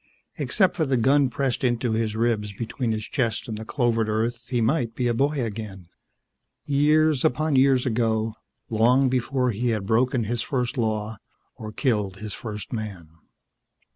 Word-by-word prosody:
Except 190 -3 +2
for 165 - +1
the 130 -1 +2
gun 135 +3 +3
pressed 135 +1 -1
into 120 -1 +1
his 110 -1 -1
ribs 110 -3 0
between 115 +3 -3
his 110 -1 -2
chest 115 -6 -1
and 110 - -4
the 110 - -6
clovered 115 -2 0
earth, 115 +3 -2
he 125 - 0
might 120 -1 0
be 125 - -1
a 120 - +2
boy 140 +5 +1
again, 100 -5 -7 0.8
years 150 0 +3
upon 155 +3 +1
years 130 -1 +4
ago, 110 -2 0 0.3
long 125 +4 +3
before 125 0 0
he 120 +3 -1
had 110 -4 -1
broken 120 +3 +2
his 115 +2 -2
first 125 -1 -2
law 110 -2 -1 0.4
or 110 -1 -7
killed 105 -7 -1
his 105 0 -5
first 105 -1 -6
man. 100 -8 -5
115 Hz, 165 wpm, -24 LUFS, 110-130 Hz, 0.8 s, years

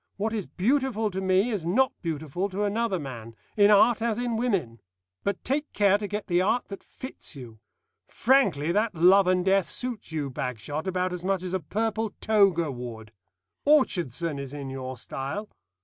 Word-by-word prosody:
What 215 +2 -1
is 210 -5 -3
beautiful 225 - 0
to 190 +1 -3
me 190 +5 +2
is 205 -6 -2
not 235 +10 +2
beautiful 165 +3 -3
to 200 +2 -2
another 210 -1 0
man, 120 -7 -8 0.2
in 205 -1 +6
art 215 +3 +5
as 225 -2 0
in 240 -1 -1
women. 195 - -1 0.4
But 200 -1 -2
take 290 +3 -1
care 205 -1 +4
to 205 - -3
get 210 +1 -4
the 175 -1 +2
art 225 +6 0
that 195 - -7
fits 260 - -9
you. 120 -5 -10 0.5
Frankly, 200 - +2
that 210 +1 +1
'Love 185 +3 +6
and 185 0 +2
Death' 195 -1 +3
suits 245 -8 -5
you, 145 -4 -3
Bagshot, 125 - -4
about 185 0 -1
as 180 -1 -5
much 190 -1 0
as 180 0 -4
a 190 - +1
purple 220 +5 -2
toga 195 -8 +3
would. 115 -3 -8 0.5
Orchardson 170 - +2
is 140 0 -6
in 140 -2 -6
your 130 -1 -5
style. 140 - -5
190 Hz, 180 wpm, -27 LUFS, 150-215 Hz, 0.5 s, in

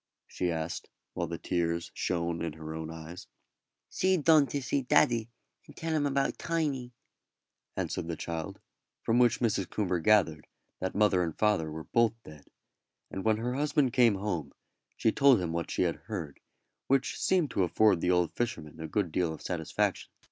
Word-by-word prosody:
she 90 - -2
asked, 80 0 -4 0.2
while 85 - -2
the 85 0 -4
tears 85 -1 -1
shone 85 -1 -1
in 80 -2 -3
her 80 0 -7
own 80 0 -5
eyes. 80 +2 -9 0.6
"See 185 0 +1
done 155 -2 +5
to 145 - -2
see 140 +1 -1
daddy, 120 -2 +3 0.4
and - - -15
tell 165 0 -2
him 145 -2 +2
about 140 0 0
Tiny," 145 -7 -1 0.9
answered - - -2
the 85 - -3
child; 80 -1 -5 0.4
from 115 +2 +2
which 120 -1 +3
Mrs. 105 -6 0
Coomber 90 -4 -1
gathered 80 -5 +3 0.3
that 95 - -3
mother 100 -3 +3
and 80 -3 -2
father 105 -7 +2
were 80 +1 -6
both 115 +2 +2
dead; 75 -2 -13 0.6
and 95 - -4
when 110 -1 +3
her 120 +3 -2
husband 140 -2 +1
came 120 -5 +5
home 95 -6 -3 0.4
she 110 - +3
told 135 -3 +5
him 85 -3 -2
what 85 0 -2
she - - 0
had 85 -2 0
heard, 85 -10 -5 0.5
which 135 -1 +1
seemed 180 -6 +2
to - - 0
afford 95 0 +3
the - - +1
old 90 -2 +2
fisherman 80 -10 -4
a 80 - -5
good 95 -1 -1
deal 85 0 0
of 80 - -8
satisfaction. 80 -4 -1
95 Hz, 175 wpm, -30 LUFS, 85-125 Hz, 0.9 s, done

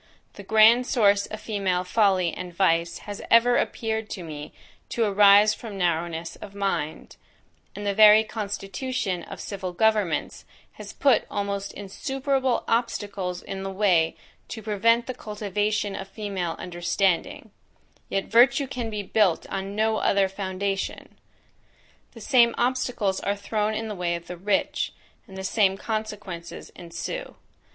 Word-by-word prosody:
The - - -10
grand 220 +4 +5
source 205 -4 +3
of 215 0 -8
female 195 -4 -1
folly 185 -3 +2
and 180 -1 -6
vice 170 -2 +1
has 205 -1 -6
ever 240 +1 +5
appeared 220 -1 -2
to 185 - -6
me 150 -2 -8 0.4
to 235 - 0
arise 205 0 +6
from 215 -4 -8
narrowness 170 -2 -1
of 200 -1 -11
mind; 195 -6 -3 0.6
and 205 - -6
the 200 - +1
very 215 +1 +8
constitution 205 -1 -3
of - - -9
civil 190 -3 -5
governments 210 -4 0 0.3
has - - -10
put 270 -5 +2
almost 200 -1 -3
insuperable 265 +5 -1
obstacles 205 -6 -2
in 195 0 -6
the 195 - -4
way 185 -5 +2 0.3
to 220 - -7
prevent 230 +3 +2
the 255 - -4
cultivation 210 -1 -2
of 190 - -6
the - - -29
female 195 -6 -3
understanding: 175 +1 -1 0.6
yet 195 - -1
virtue 240 +4 +4
can 250 -3 -4
be 210 -2 -4
built 195 -3 +2
on 195 +1 -4
no 220 0 +1
other 195 -2 +2
foundation! 195 0 -4 1.0
The 230 - -12
same 235 0 +4
obstacles 245 -5 0
are 200 - -1
thrown 210 +1 -2
in 225 +1 -3
the 215 - -4
way 175 -3 -1
of 170 0 -7
the 180 - -7
rich, 195 +3 -1 0.3
and 190 - -11
the 190 - -5
same 195 -1 +2
consequences 210 -6 -5
ensue. 175 - -6
200 Hz, 145 wpm, -25 LUFS, 190-220 Hz, 1.0 s, very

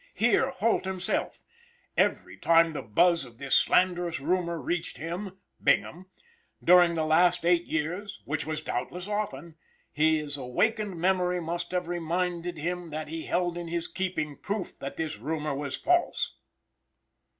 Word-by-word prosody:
Hear 240 +3 +3
Holt 230 -6 +1
himself: 190 -1 -2 0.5
"Every - - +1
time 165 0 +4
the - - -3
buzz 170 - +3
of 120 -3 -13
this 140 0 -3
slanderous 175 -3 +3
rumor 170 +2 0
reached 165 +3 -3
him 180 +6 -5 0.3
(Bingham) 180 +2 +1 0.6
during 175 -1 +6
the 160 -1 0
last 175 +2 +3
eight 175 0 +3
years 180 +7 -3
which 155 +1 -2
was 155 0 -4
doubtless 175 +9 -4
often 205 -6 -4 0.3
his 150 -1 +1
awakened 200 - 0
memory 180 0 +2
must 170 +1 -3
have 180 -1 -2
reminded 175 0 -2
him 175 +2 -3
that 155 0 -5
he 160 0 -5
held 175 -1 0
in 170 - -6
his 170 0 -2
keeping 180 -6 -3
proof 205 -2 -4
that 135 - -6
this 155 -9 -3
rumor 150 +3 -2
was 140 0 -3
false." 350 +1 +1
170 Hz, 145 wpm, -28 LUFS, 155-180 Hz, 0.6 s, during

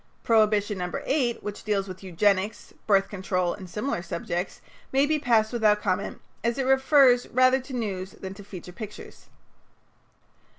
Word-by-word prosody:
Prohibition 210 -3 +2
No. 180 0 -3
8, 260 -4 0
which 205 0 -6
deals 200 -2 0
with 185 -1 -8
eugenics, 195 +3 0
birth 195 -2 +4
control 185 -3 -1
and 190 -3 -10
similar 210 0 -2
subjects, 175 0 -4 0.3
may 270 +1 +4
be 305 +1 +1
passed 230 -4 +2
without 215 -3 +3
comment, - - -2 0.2
as 235 +2 0
it 270 - 0
refers 265 -1 +5
rather 255 +1 +4
to 260 +1 -10
news 195 -6 -3
than 190 0 -8
to 200 +1 -12
feature 185 -3 -10
pictures. 210 0 -10
210 Hz, 155 wpm, -26 LUFS, 190-245 Hz, 0.3 s, refers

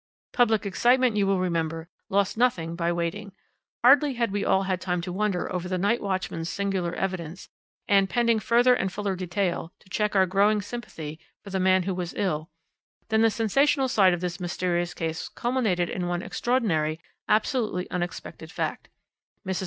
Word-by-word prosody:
"Public 225 -4 +3
excitement, 245 +4 +3
you 200 -2 +2
will 195 0 +2
remember, 165 -2 -2 0.2
lost 200 -1 +1
nothing 185 -9 +1
by 170 0 0
waiting. 175 +4 -3 0.5
Hardly 275 +2 +6
had 235 -3 0
we 200 0 -1
all 190 - +2
had 185 -1 -2
time 180 -2 -1
to 180 +1 -5
wonder 195 -2 -1
over 180 0 -3
the 185 - 0
night 205 +6 +1
watchman's 185 -4 -3
singular 195 -3 -2
evidence, 180 -2 -4 0.4
and, 195 -1 +4
pending 235 -2 +2
further 240 +4 +4
and 190 -6 0
fuller 200 -1 -2
detail, 180 -1 -2
to - - -24
check 210 0 0
our 190 -1 +5
growing 200 +3 +3
sympathy 185 -8 -7 0.2
for 200 - -10
the 190 - -1
man 185 0 +3
who 190 +1 -2
was 180 -1 -4
ill, 155 -5 -1 0.6
than 220 0 +3
the 225 - +5
sensational 265 +6 +2
side 190 -7 +4
of 175 - -8
this 180 +1 -3
mysterious 175 -1 -1
case 160 0 -3
culminated 225 -8 0
in 180 0 -3
one 175 0 -2
extraordinary, 165 -11 0 0.3
absolutely 215 -3 +1
unexpected 180 0 -5
fact. - - -4 0.6
Mrs. 190 -1 -2
190 Hz, 170 wpm, -26 LUFS, 175-215 Hz, 0.6 s, Hardly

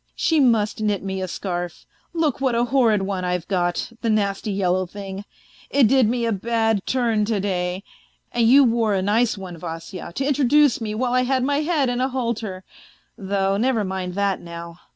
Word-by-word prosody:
She 325 -3 +2
must 225 -5 +2
knit 210 -3 0
me 190 -1 -3
a 185 - -2
scarf; 175 -1 -5 0.3
look 315 -6 -1
what 260 -3 +1
a 235 - +2
horrid 235 -5 +2
one 190 -1 -3
I've 180 -1 -2
got, 175 +2 -1
the 230 - 0
nasty 205 -1 0
yellow 185 -1 0
thing, 195 +1 -7 0.4
it 275 -5 +4
did 255 -2 +4
me 240 0 0
a 230 - 0
bad 225 0 0
turn 235 -4 +1
to 215 -1 -1
day! 185 -1 -2 0.5
And 235 -1 +2
you 275 +4 +7
wore 230 -4 +2
a 190 - 0
nice 220 +3 +2
one, 185 -3 -8
Vasya, 165 +2 -7
to 270 - -1
introduce 285 -1 +3
me 215 -1 -3
while 245 +2 -1
I 255 - +3
had 255 0 +1
my 285 +2 +1
head 305 -3 +1
in 245 0 -1
a 260 - +2
halter.... 230 -7 -3 0.5
Though 195 -2 -1
never 235 0 +1
mind 185 -2 -4
that 200 -1 0
now. 170 0 -9
215 Hz, 195 wpm, -22 LUFS, 190-245 Hz, 0.5 s, you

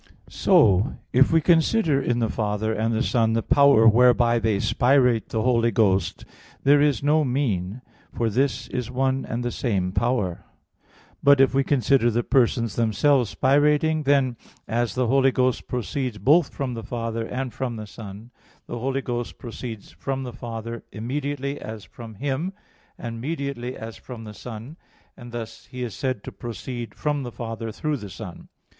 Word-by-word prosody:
So 100 +7 +3 0.2
if 130 +2 +5
we 165 0 +4
consider 165 -2 +3
in 120 -2 0
the 115 -2 +1
Father 110 0 -1
and 110 +1 0
the 115 +2 +1
Son 115 -3 +2
the 115 0 0
power 140 -5 +5
whereby 120 +1 +5
they 110 -2 +1
spirate 125 -1 +2
the 110 -1 -1
Holy 120 -2 +3
Ghost, 100 -6 +1 0.4
there 145 +1 +5
is 145 -4 +2
no 150 +2 +3
mean, 125 -5 -1 0.3
for 115 - -1
this 130 +6 0
is 125 -2 -3
one 130 +1 0
and 120 +2 -3
the 120 - -2
same 95 -8 -1
power. 105 -5 -1 0.8
But 140 -1 +6
if 135 0 +5
we 135 0 +3
consider 130 -2 +3
the 120 +1 0
persons 115 -3 +1
themselves 120 +2 +2
spirating, 150 +3 +3
then, 135 -4 +2 0.3
as 115 -2 -1
the 125 - +1
Holy 135 +2 +4
Ghost 130 -1 0
proceeds 125 -1 -3
both 140 - +3
from 135 -3 -3
the 115 - -5
Father 115 0 -4
and 130 -1 -4
from 125 -3 -3
the 110 -1 -6
Son, 105 +2 -10 0.3
the 120 - -6
Holy 135 +3 -1
Ghost 120 -1 -4
proceeds 115 -3 -8
from 135 -1 -4
the 125 -2 -6
Father 115 0 -6
immediately, 140 +4 -3
as 110 -2 -7
from 115 -2 -11
Him, 145 - -2 0.4
and 115 -1 -6
mediately, 140 -4 -4
as 110 0 -8
from 120 -3 -9
the 105 -1 -9
Son; 120 +7 -9 0.4
and 120 -2 -11
thus 115 -2 -7
He 125 0 -6
is 115 -4 -4
said 130 -6 -3
to - - -7
proceed 120 -1 -7
from 145 -1 -1
the 125 -2 -5
Father 115 -1 -5
through 150 +6 -2
the 105 -5 -8
Son. 90 - -9
120 Hz, 170 wpm, -24 LUFS, 115-135 Hz, 0.8 s, But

